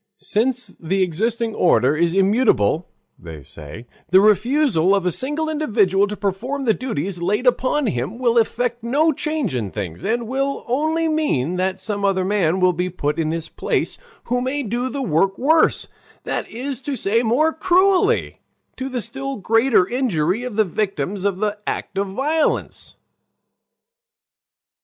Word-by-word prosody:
"Since 245 +3 -1
the 190 +4 0
existing 225 +6 -1
order 140 - +3
is 170 +2 +1
immutable," 195 - +2 0.3
they 80 -4 -10
say, 75 - -11 0.2
"the 185 +3 +6
refusal 215 - +3
of 195 -2 -1
a 180 - +2
single 295 - -1
individual 210 -11 +2
to 210 0 -6
perform 245 +8 -3
the 225 - +4
duties 195 - -4
laid 210 +8 0
upon 255 +3 +2
him 130 - -2
will 240 -2 +2
effect 240 +1 -1
no 290 +7 +2
change 305 - -2
in 115 -6 -2
things, 95 - -6
and 230 +3 -1
will 275 +3 -2
only 315 +6 0
mean 180 - 0
that 190 +1 -1
some 200 +1 -3
other 190 -2 +1
man 190 -3 +1
will 185 -1 +3
be 180 +2 -2
put 150 -3 -2
in 155 -1 0
his 165 0 -3
place - - -2 0.2
who 245 +1 -1
may 275 +3 -2
do 240 +3 -2
the 275 +2 -4
work 195 0 +1
worse, 315 +5 +2 0.4
that - - -3
is 265 +3 -5
to 285 0 -3
say, 230 -1 +1
more 265 +8 +2
cruelly, 375 +5 +2 0.4
to 260 +1 -4
the 250 -2 -3
still 275 +3 -4
greater 225 -2 +3
injury 210 - 0
of 250 -4 -5
the 215 0 +3
victims 195 -1 -3
of 200 -2 0
the 210 +1 -2
act - - -4
of 200 - -1
violence." 295 +10 -1
215 Hz, 160 wpm, -21 LUFS, 185-265 Hz, 0.4 s, the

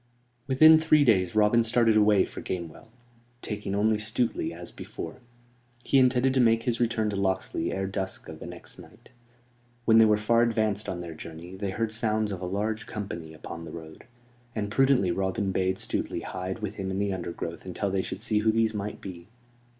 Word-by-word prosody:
Within 155 +4 +7
three 155 -2 +4
days 95 -7 +3
Robin 110 +2 +4
started 115 -1 +3
away 105 -2 +5
for - - -9
Gamewell, 85 +3 -6 0.6
taking 105 -2 -3
only 105 +1 +2
Stuteley, 110 +3 -1
as - - -8
before. 80 - -8 0.7
He 135 - +3
intended 130 0 +3
to 135 - +2
make 115 -2 +4
his 120 -2 0
return 115 -3 +1
to - - -3
Locksley 95 -3 -1
ere 95 0 -2
dusk 95 -1 -4
of - - -9
the - - -8
next - - -10
night. 110 +3 -16 0.8
When 115 -1 +6
they 115 - +8
were 105 -1 +4
far 115 +2 +3
advanced 110 -3 0
on 90 - -4
their 85 -2 -7
journey 85 +3 -9
they 100 +1 -3
heard 110 +3 -2
sounds 110 -1 0
of 95 -2 -5
a - - -3
large 105 +4 -2
company 85 -6 -6
upon 85 +1 -8
the 80 - -8
road; 80 -1 -10 0.5
and 105 -2 -2
prudently 130 -6 +3
Robin 95 +2 -1
bade 95 0 0
Stuteley - - -2
hide 95 +3 -5
with 105 0 -4
him 95 -2 -3
in 95 - -2
the 100 0 0
undergrowth 85 -2 -5
until 95 +2 -3
they 95 0 +1
should 95 - -6
see 110 -2 +1
who 110 +1 +3
these 115 0 +1
might 105 0 -5
be. 85 -2 -9
105 Hz, 195 wpm, -27 LUFS, 95-115 Hz, 0.8 s, they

